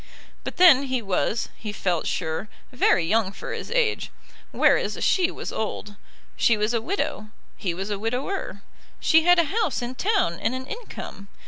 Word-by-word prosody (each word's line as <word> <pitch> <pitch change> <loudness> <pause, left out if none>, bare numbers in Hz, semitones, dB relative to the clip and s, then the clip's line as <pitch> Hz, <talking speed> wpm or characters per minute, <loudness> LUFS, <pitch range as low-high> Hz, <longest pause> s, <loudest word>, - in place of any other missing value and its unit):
But - - -6
then 320 -7 +7
he 260 -1 -1
was, 210 +1 -1
he 215 - -6
felt 180 -5 -1
sure, 160 +4 -2 0.2
very 215 -9 +3
young 205 +2 +2
for - - -7
his - - -6
age, 465 -2 +1 0.4
whereas - - +2
she 360 -2 +3
was - - -6
old. 210 -1 -4 0.4
She 230 - +3
was 210 +3 0
a 230 - +1
widow; 225 - -3 0.3
he 180 -5 -3
was 195 +3 -4
a 200 - -2
widower. 245 - -3 0.4
She 320 0 +4
had 355 0 +6
a 335 - +5
house 405 - 0
in 240 +1 -4
town 375 - 0
and 250 - -1
an 260 0 -5
income. 445 - -8
235 Hz, 175 wpm, -24 LUFS, -, 0.4 s, then